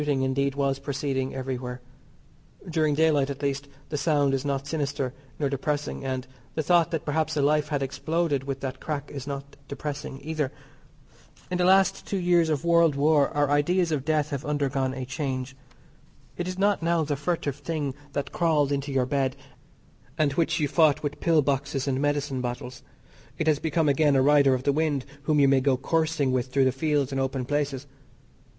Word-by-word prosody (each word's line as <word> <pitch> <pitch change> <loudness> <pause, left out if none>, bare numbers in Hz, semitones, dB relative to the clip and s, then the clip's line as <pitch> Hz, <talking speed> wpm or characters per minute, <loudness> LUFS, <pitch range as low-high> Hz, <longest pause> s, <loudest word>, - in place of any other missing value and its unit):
Shooting, 145 -3 0
indeed, 135 +1 0
was 140 -1 0
proceeding 135 -1 -2
everywhere. 125 -1 -4 0.9
During 155 -3 +1
daylight, 150 -3 +3
at 140 +1 -6
least, 140 0 -1 0.2
the 150 - -2
sound 145 -2 +2
is 135 -1 0
not 140 -1 -2
sinister 140 -3 -2 0.2
nor 145 - 0
depressing, 145 +1 -2
and 130 -1 -3 0.3
the 155 - 0
thought 170 +1 +4
that 165 -3 -3
perhaps 155 +1 0
a - - +3
life 150 +1 +2
had 145 -2 -1
exploded 150 0 -1
with 135 -1 -4
that 130 -1 -4
crack 145 -2 -4
is 140 -1 -7
not 140 0 -6
depressing 140 -1 -5
either. 155 -3 -2 1.0
In 180 - -1
the 180 - +3
last 190 +1 +3
two 200 - -1
years 175 -2 +3
of 150 0 -1
world 170 -3 +4
war 145 0 +3
our 145 -1 +1
ideas 165 +4 +2
on 150 - +1
death 150 +1 0
have 140 -2 -3
undergone 135 -3 -1
a 130 -1 -4
change. 130 -1 -4 0.8
It 175 - -3
is 185 0 -4
not 200 0 +2
now 165 0 +2
the 145 -1 -1
furtive 145 -2 -2
thing 150 -5 -3 0.2
that 140 - -3
crawled 155 -4 +2
into 140 0 -2
your 130 -2 +2
bed 135 0 0 0.8
and 155 -3 +2
which 165 +2 +1
you 150 - +1
fought 155 -1 +3
with 145 0 -3
pill 160 -3 +3
boxes 135 0 -1
and 135 0 0
medicine 145 -2 0
bottles. 125 0 -5 0.6
It 160 - -1
has 155 -2 +3
become 160 0 +1
again 145 0 +3
a 130 - +4
rider 140 -2 +5
of 130 - -4
the 140 - +2
wind 150 -3 0 0.2
whom 150 -1 +3
you 140 - +6
may 135 -1 +4
go 130 -1 +2
coursing 160 -1 0
with 130 -1 0
through 135 +1 +2
the 130 - +3
fields 145 0 0
and 135 0 -1
open 130 -1 -2
places. 145 -1 -1
145 Hz, 190 wpm, -26 LUFS, 135-155 Hz, 1.0 s, you